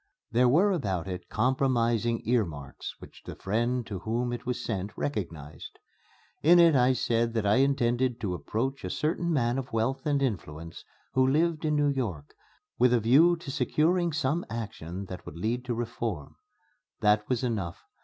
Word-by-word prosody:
There 125 +2 +4
were 180 +10 +4
about 95 - -1
it 90 -1 -6
compromising 120 -2 +1
earmarks 85 - -2
which - - -14
the - - -8
friend 120 +4 -1
to 100 -4 -5
whom 120 +4 -2
it 120 - -6
was 125 -1 -2
sent 100 -1 -4
recognized. 85 - -5 0.6
In 170 +4 +6
it 165 -3 +6
I 125 0 +4
said 115 -2 0
that 110 -2 0
I 100 +3 +4
intended 130 -2 +2
to 95 -4 -1
approach 130 +9 -3
a 90 - -3
certain 160 - -1
man 125 -4 +1
of 125 - -7
wealth 130 +6 -1
and 145 -1 +2
influence 85 - -4 0.3
who 130 0 +3
lived 160 +2 +1
in 150 -1 +1
New 145 -1 +3
York, 105 - -3 0.5
with 125 0 +5
a - - +3
view 145 +11 +5
to 165 -5 -8
securing 170 +4 +1
some 155 +2 0
action 100 -5 -5
that 90 -1 -8
would - - -8
lead 115 +7 -1
to 120 -2 -2
reform. 115 -9 -4 0.7
That 105 0 +3
was 125 -1 0
enough. 100 -9 -3
120 Hz, 170 wpm, -28 LUFS, 105-135 Hz, 0.7 s, In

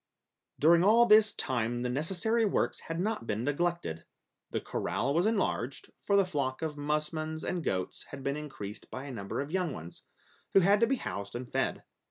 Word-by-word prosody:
During 165 +3 +5
all 225 +4 +6
this 215 -1 +6
time 120 -2 -1
the - - 0
necessary 185 - 0
works 210 - +1
had 165 0 -5
not 210 - -1
been 110 +2 -1
neglected. 145 - -1 0.5
The - - -1
corral 105 +11 -1
was 175 +6 +3
enlarged, 190 - -1
for 200 - +1
the 200 -1 +5
flock 140 -4 -2
of 155 -2 -2
musmons 155 +2 -2
and 175 -2 -2
goats 95 -7 -2
had 135 -1 -8
been 140 +1 0
increased 135 -9 -7
by 130 - -6
a 140 - -7
number 100 0 -4
of 140 +2 -6
young 180 -5 0
ones, 85 -3 -9 0.5
who 195 - +7
had 200 +3 +5
to 230 - +4
be 270 - +2
housed 100 - -5
and 125 +1 -4
fed. 135 +1 -1
150 Hz, 190 wpm, -30 LUFS, 125-185 Hz, 0.5 s, who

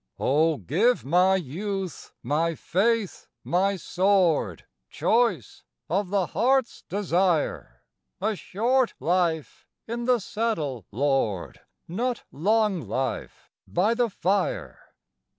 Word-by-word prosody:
O 155 +3 +2
give 185 - +1
my 180 +6 +4
youth, 190 +2 -4
my 160 +6 0
faith, 210 +4 0 0.2
my 195 +3 +1
sword, 180 - +1 0.2
Choice 225 - 0 0.3
of 190 +1 0
the 195 -2 +1
heart's 260 +3 +1
desire: 175 - 0 0.4
A 215 +2 0
short 240 +7 0
life 170 -3 -1 0.2
in 235 +1 -3
the 250 0 +4
saddle, 165 - -3
Lord! 120 -6 0 0.3
Not 240 +8 -2
long 205 +3 +1
life 130 0 -4 0.2
by 200 +6 +2
the 240 0 +1
fire. 195 0 -1
185 Hz, 100 wpm, -26 LUFS, 160-220 Hz, 0.4 s, my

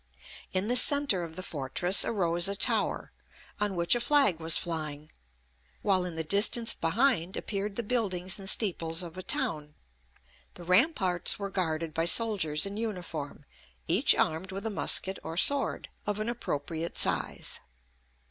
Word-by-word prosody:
In 190 +2 -2
the 245 - 0
centre 280 -7 +5
of 165 -1 -9
the 185 - -6
fortress 165 +6 +2
arose 175 -4 0
a 200 - -1
tower, - - -1 0.5
on 205 -2 -1
which 170 -1 +2
a 240 - 0
flag 275 - +2
was 160 0 +3
flying; 155 -3 -5 0.7
while 190 -3 +2
in 175 -2 -5
the 160 - -2
distance 205 +7 +3
behind 185 0 -1
appeared 200 -1 -4
the 235 - -3
buildings 195 -6 -1
and 195 -1 -4
steeples 170 -6 +1
of 170 -1 -10
a 185 - -7
town. 150 -4 -3 0.8
The 175 - -11
ramparts 185 - +2
were 200 -1 -6
guarded 165 -4 -3
by 165 +1 -1
soldiers 180 -7 +3
in 200 +1 -4
uniform, 180 -10 -6 0.4
each - - +3
armed 165 +5 -2
with 195 +3 -7
a 225 - -2
musket 190 -1 +3
or 165 +1 -8
sword, 280 +8 +2 0.2
of 210 0 -2
an 215 +2 -3
appropriate 165 -7 -5
size. - - 0
185 Hz, 155 wpm, -28 LUFS, 165-210 Hz, 0.8 s, centre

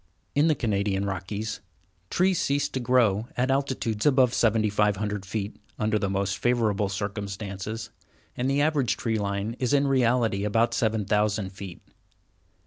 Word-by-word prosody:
] - - -43
In 145 +3 +4
the 155 - +3
Canadian 100 -4 0
Rockies, 100 +3 -4 0.5
trees 185 -1 +2
cease 140 +1 +1
to 130 - -3
grow 115 -4 +2
at 130 +2 +2
altitudes 130 -5 -1
above 130 -4 +4
7500 105 -2 +1
feet, 100 +1 -4 0.2
under 110 0 +1
the 100 - -1
most 100 0 -1
favorable 110 -5 +1
circumstances, 100 +2 -5 0.4
and 125 +2 -1
the 140 +1 +2
average 145 -6 +1
tree 110 -2 -1
line 100 +2 -2
is 125 -1 0
in 140 0 +4
reality 120 -6 +2
about 115 +3 +2
7000 105 -2 +1
feet. 95 -2 -9
110 Hz, 140 wpm, -26 LUFS, 100-125 Hz, 0.5 s, In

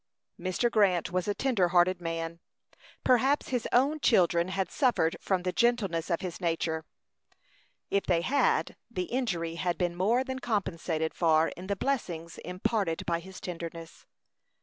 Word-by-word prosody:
Mr. 185 +7 0
Grant 190 -6 +3
was 180 +1 -1
a 205 - 0
tender 235 -10 +2
hearted 175 +1 +3
man. 165 0 -4 0.6
Perhaps 265 +3 +3
his 250 -3 -1
own 280 +5 +3
children 175 - +3
had 190 0 -2
suffered 240 - +2
from 185 -2 0
the 180 - 0
gentleness 200 -8 +1
of 170 - 0
his 180 0 -5
nature; 165 -2 -1 1.1
if 200 - +1
they 170 -2 +3
had, 275 +10 +1
the 185 -6 -2
injury 175 -8 -2
had 175 -2 0
been 175 -1 -1
more 220 +8 +2
than 260 -1 -4
compensated 170 -8 -1
for 160 -1 +3
in 180 +2 -9
the 200 - 0
blessings 175 -10 -3
imparted 180 0 -1
by 170 -1 0
his 190 +2 -11
tenderness. 165 -2 -7
180 Hz, 150 wpm, -29 LUFS, 170-225 Hz, 1.1 s, Grant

